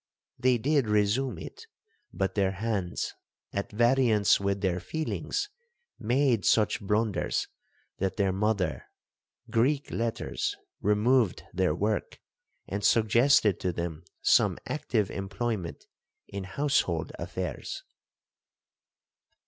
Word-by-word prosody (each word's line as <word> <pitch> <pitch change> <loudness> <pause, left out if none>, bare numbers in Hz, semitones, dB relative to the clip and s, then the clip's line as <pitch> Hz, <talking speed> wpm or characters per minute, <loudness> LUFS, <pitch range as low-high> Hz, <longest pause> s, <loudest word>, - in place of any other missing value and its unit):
They 125 0 +4
did 140 +1 +2
resume 105 +5 +1
it, 450 0 -9 0.4
but 95 -1 -1
their 95 -2 +1
hands, 100 -3 -2 0.4
at 100 - -3
variance 120 -2 +4
with 100 0 -1
their 90 -2 +1
feelings, 160 - -3 0.5
made 120 -2 +2
such 105 +3 +3
blunders, 105 -1 0 0.5
that 95 0 -1
their 100 -2 +2
mother,, 95 - 0 1.9
removed 110 0 +2
their 90 -3 +1
work, 105 +4 -1 0.5
and 100 +2 -3
suggested 115 -2 +4
to 90 - 0
them 85 -1 -4 0.2
some - - +4
active 115 -9 -1
employment 95 -1 -3 0.4
in 100 -1 -6
household 95 - 0
affairs. - - -4
105 Hz, 95 wpm, -28 LUFS, 95-120 Hz, 1.9 s, They